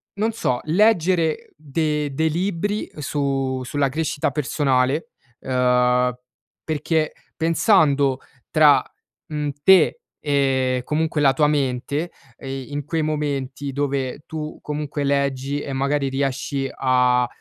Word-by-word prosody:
non 220 +3 0
so, 130 - -1
leggere 175 -2 +2
de 150 -1 -2
dei 160 +3 +1
libri 195 +5 -2
su 135 -2 -1
sulla 140 +2 0
crescita 150 +1 -1
personale, 140 - 0 0.3
uhm, 125 -1 +2 0.5
perché 155 0 -1 0.2
pensando 155 - +3 0.3
tra, 150 -2 +6 0.4
mhmm, 150 -1 -2
te 190 - +6 0.3
e 130 -3 +1
comunque 155 0 -1
la 140 -2 +4
tua 150 +2 +3
mente, 145 +2 -1 0.3
ehm, 135 -1 -6
in 145 -1 -4
quei 160 +2 -1
momenti, 145 -3 -2
dove 140 -1 -2
tu 155 -1 -6
comunque 150 -1 -4
leggi 140 0 0
e 140 - -5
magari 140 +1 0
riesci 135 0 -2
a 125 -1 +2
145 Hz, 115 wpm, -22 LUFS, 135-155 Hz, 0.5 s, tra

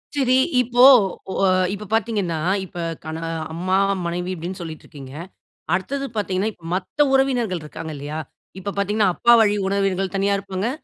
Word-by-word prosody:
சரி. 260 -3 +3 0.3
இப்போ 245 0 +3 0.5
ஒ - - -3 0.4
இப்ப 210 +1 -6
பார்த்தீங்கன்னா, 210 -7 0 0.3
இப்ப 175 - -13 0.3
கண 160 0 -5 0.4
அம்மா, 185 +3 -1 0.3
மனைவி 175 +2 -3
அப்படீன்னு 180 +3 -6
சொல்லிட்டிருக்கீங்க. 150 -5 -9 0.6
அடுத்தது 275 +10 -1
பார்த்தீங்கன்னா, 205 0 -1
இப்ப 170 - -19
மத்த 195 +10 0
உறவினர்கள் 245 -9 +1
இருக்காங்க 155 +1 -7
இல்லையா? 145 +2 -5 0.4
இப்ப 200 +1 -5
பார்த்தீங்கன்னா, 205 +1 +2
அப்பா 235 - +5
வழி 210 -1 +3
உறவினர்கள் 195 -1 0
தனியா 200 +1 +2
இருப்பாங்க. 195 +2 -3
195 Hz, 140 wpm, -22 LUFS, 175-220 Hz, 0.6 s, அப்பா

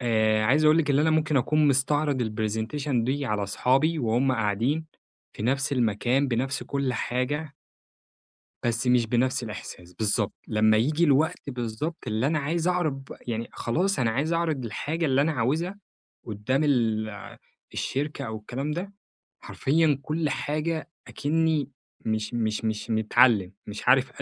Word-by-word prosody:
آآ 110 -3 +2
عايز 145 +7 +3
أقول 155 +2 +6
لك 145 -3 +1
اللي 140 +2 +3
أنا 160 - +3
ممكن 155 -1 +2
أكون 150 +3 +3
مستعرض 140 0 +1
الPresentation 110 +4 -1
دي 140 +2 -1
على 105 -2 -1
أصحابي 135 +10 +1
وهم 125 +2 +1
قاعدين 115 +8 0 0.5
في - - -7
نفس 135 +4 0
المكان، 125 +3 +1
بنفس 130 +4 -1
كل 140 -2 -1
حاجة 140 +5 -2 1.1
بس 120 +1 -1
مش 125 -2 +4
بنفس 125 +2 +1
الإحساس، 90 -5 -8
بالضبط. 105 0 0 0.2
لما 110 0 +4
ييجي 150 +9 +2
الوقت 145 0 +1
بالضبط 125 +6 -3
اللي 110 +4 0
أنا 155 +1 +1
عايز 165 +4 -1
أعرض 180 -5 +1
ب - - -10
يعني 115 0 -2
خلاص 180 +11 0
أنا 115 -3 +2
عايز 145 +8 -1
أعرض 160 -6 0
الحاجة 160 +8 -2
اللي 135 0 +3
أنا 160 +2 +2
عاوزها 155 - -1 0.5
قدام 115 +7 -1
ال 115 -6 +1 0.7
الشركة 145 0 -3
أو 110 - -4
الكلام 130 +7 -4
ده، 180 +6 -4 0.5
حرفيًا 150 0 +1
كل 155 +2 -1
حاجة 155 +4 -2 0.2
أكني 155 -2 0 0.4
مش 110 +1 -1
مش 110 -1 -1
مش 110 0 -2
متعلم، 110 -2 +3
مش 105 +3 -5
عارف 130 +1 +5
130 Hz, 150 wpm, -26 LUFS, 115-150 Hz, 1.1 s, أقول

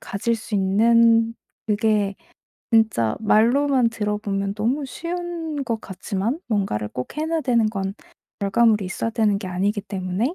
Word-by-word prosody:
가질 230 +4 -1
수 220 -1 -7
있는 230 +3 +4 0.3
그게 210 -1 +1 0.6
진짜 215 - +3
말로만 240 +4 +3
들어 210 -2 -2
보면 200 -1 -2
너무 255 +7 -1
쉬운 335 0 -4
것 230 -3 -2
같지만 200 - -3
뭔가를 195 - -1
꼭 125 - -6
해 310 - -1
놓아야 325 -1 -1
되는 235 -4 +2
건 195 -2 -3 0.5
결과물이 210 0 +3
있어야 225 +4 -3
되는 215 -3 +2
게 200 - -7
아니기 200 +3 0
때문에 195 - -2
220 Hz, 295 characters per minute, -22 LUFS, 200-235 Hz, 0.6 s, 있는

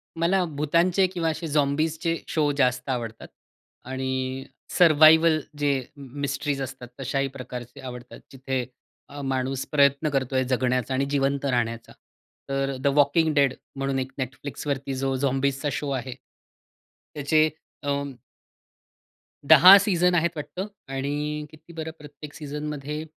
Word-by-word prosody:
मला 175 +3 +2
भूतांचे 170 +6 +3
किंवा 175 -3 -2
असे 165 +1 -4
झॉम्बीजचे 155 +3 0
शो 150 -3 +1
जास्त 125 -1 +1
आवडतात. 115 -3 -4 0.6
आणि, 130 0 -3 0.3
सर्व्हायव्हल 160 -1 +6 0.2
जे 145 -1 +1 0.3
मिस्ट्रीज 140 +1 -3
असतात 125 -1 -6
तशाही 135 +1 -1
प्रकारचे 125 0 -8
आवडतात. 125 -2 -9
जिथे 130 -1 -3 0.4
अ, 145 0 -8
माणूस 135 -1 -2
प्रयत्न 140 +1 +3
करतोय 130 -1 +1
जगण्याचा 125 0 0
आणि 135 +1 +1
जिवंत 140 0 0
राहण्याचा. 115 -3 -1 0.6
तर 135 0 -1
द 130 - 0
वॉकिंग 150 +2 +3
डेड 140 -3 +3 0.2
म्हणून 135 -1 -1
एक 130 0 -4
Netflixवरती 140 +1 -4
जो 135 0 -1
झॉम्बीजचा 135 +1 0
शो 140 +3 -3
आहे, 130 -1 -3 1.0
त्याचे 155 +2 +3 0.3
अ 145 - -2 1.6
10 185 +3 +10
सीझन 180 -3 +2
आहेत 170 0 +3
वाटतं 180 +6 -5 0.3
आणि 150 +2 -2
किती 160 +2 -16
बरं 160 -1 -5
प्रत्येक 150 0 -11
सीझनमध्ये? 150 0 -5
140 Hz, 120 wpm, -25 LUFS, 130-155 Hz, 1.6 s, 10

